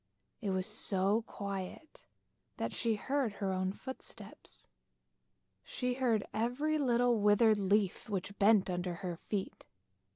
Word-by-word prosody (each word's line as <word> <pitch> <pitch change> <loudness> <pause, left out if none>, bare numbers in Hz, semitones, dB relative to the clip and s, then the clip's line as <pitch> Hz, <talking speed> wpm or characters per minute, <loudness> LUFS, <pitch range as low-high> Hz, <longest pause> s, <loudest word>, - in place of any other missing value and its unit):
It 205 - -2
was 190 -1 0
so 205 0 +1
quiet 200 +9 -6 0.5
that - - -2
she 230 -2 +1
heard 265 0 -1
her 195 -2 -2
own 185 0 0
footsteps, 260 +6 -10 1.0
she 250 -1 -2
heard 245 -5 +1
every 255 +8 0
little 245 -3 +3
withered 210 +1 +5
leaf 200 +1 +1
which 200 0 -4
bent 205 -1 +5
under 180 -1 -2
her 175 -1 -2
feet. 195 +3 -5
210 Hz, 125 wpm, -33 LUFS, 190-240 Hz, 1.0 s, withered